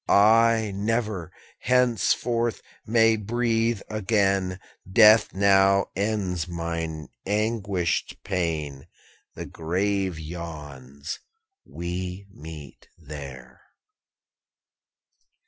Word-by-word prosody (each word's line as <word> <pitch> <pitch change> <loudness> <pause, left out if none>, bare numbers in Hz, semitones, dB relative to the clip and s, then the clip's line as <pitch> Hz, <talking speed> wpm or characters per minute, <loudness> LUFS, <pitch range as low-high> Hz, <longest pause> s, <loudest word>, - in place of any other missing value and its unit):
'I 110 +1 +5
never, 105 -4 -2 0.3
henceforth, 120 -1 +1 0.2
may 115 0 +4
breathe 115 0 0
again; 100 -3 0 0.3
Death 110 +2 +7
now 100 0 +3
ends 95 -4 -1
mine 85 -2 -4 0.2
anguished 105 -4 -1
pain. 80 -7 -3 0.5
The - - -6
grave 95 +2 -1
yawns, 75 -3 -7 0.4
we 90 +2 -5
meet 75 -5 -11
there.' 70 -5 -10
95 Hz, 70 wpm, -25 LUFS, 85-110 Hz, 0.5 s, Death